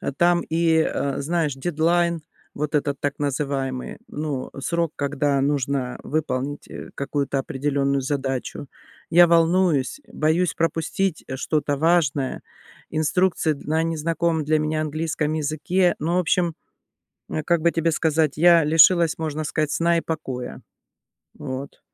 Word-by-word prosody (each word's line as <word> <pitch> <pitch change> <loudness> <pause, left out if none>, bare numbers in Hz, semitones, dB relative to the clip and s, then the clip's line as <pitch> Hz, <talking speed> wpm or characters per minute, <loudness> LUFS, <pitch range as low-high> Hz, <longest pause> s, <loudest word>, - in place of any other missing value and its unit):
а - - -3
там 175 +3 +3
и, 165 0 +1
э, 140 -3 0
знаешь, 155 -1 0
дедлайн, 170 +2 +1 0.3
вот 150 +1 -3
этот 140 -1 -1
так 145 -1 -1
называемый, 135 -2 -2
ну, 145 -3 -4
срок, 170 +2 -1
когда 140 0 0
нужно 135 -2 -1
выполнить, 145 -2 -3
э, - - -9
какую-то 140 0 -2
определенную 140 -1 -1
задачу. 135 0 -3 0.4
Я 175 +1 +7
волнуюсь, 170 - +2
боюсь 160 +3 +1
пропустить, 165 +2 -1
э, 130 - -5
что-то 145 0 -1
важное, 150 -4 +1 0.5
инструкции 160 +1 +1
д - - -12
на 160 +2 +1
незнакомом 165 0 0
для 155 +1 +2
меня 155 0 -1
английском 155 0 -2
языке, 155 +4 +1
ну, 165 +4 -1
в - - +3
общем, 175 -1 +1 0.8
э, 155 - -2
как 170 +1 +1
бы 170 +1 +3
тебе 165 0 +1
сказать, 155 -2 +1
я 170 -1 +6
лишилась, 165 +2 +5
можно 155 -1 -3
сказать, 155 0 -1
сна 170 +2 +2
и - - +1
покоя. 130 -7 -5 0.8
Вот. 130 +2 -6
155 Hz, 135 wpm, -23 LUFS, 140-165 Hz, 0.8 s, Я